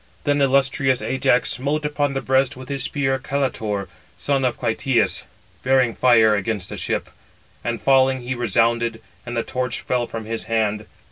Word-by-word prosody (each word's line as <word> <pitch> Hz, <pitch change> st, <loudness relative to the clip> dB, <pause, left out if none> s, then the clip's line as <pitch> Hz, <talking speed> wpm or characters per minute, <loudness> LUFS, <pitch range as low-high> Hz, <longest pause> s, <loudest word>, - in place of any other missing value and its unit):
Then 145 Hz, -1 st, +1 dB
illustrious 135 Hz, -1 st, +2 dB
Ajax 125 Hz, -2 st, +2 dB
smote 145 Hz, +4 st, -1 dB
upon 145 Hz, -2 st, -1 dB
the 135 Hz, -, -2 dB
breast 130 Hz, -1 st, +1 dB
with 130 Hz, 0 st, -10 dB
his 140 Hz, -1 st, -2 dB
spear 135 Hz, -1 st, 0 dB
Caletor, 115 Hz, -8 st, -2 dB, 0.3 s
son 140 Hz, -2 st, 0 dB
of 125 Hz, -2 st, 0 dB
Clytius, 115 Hz, +2 st, 0 dB, 0.4 s
bearing 130 Hz, -2 st, +3 dB
fire 115 Hz, -4 st, +5 dB
against 105 Hz, -2 st, -2 dB
the -, -, -6 dB
ship; -, -, -2 dB, 0.6 s
and 115 Hz, -1 st, -2 dB
falling, 130 Hz, -1 st, +3 dB
he 125 Hz, +1 st, -3 dB
resounded, 115 Hz, 0 st, +1 dB, 0.3 s
and 120 Hz, 0 st, -4 dB
the 115 Hz, -, +1 dB
torch 125 Hz, -2 st, -3 dB
fell 125 Hz, -1 st, -1 dB
from 115 Hz, -1 st, -6 dB
his 115 Hz, +1 st, -4 dB
hand. 110 Hz, -2 st, -1 dB
125 Hz, 160 wpm, -22 LUFS, 115-135 Hz, 0.6 s, fire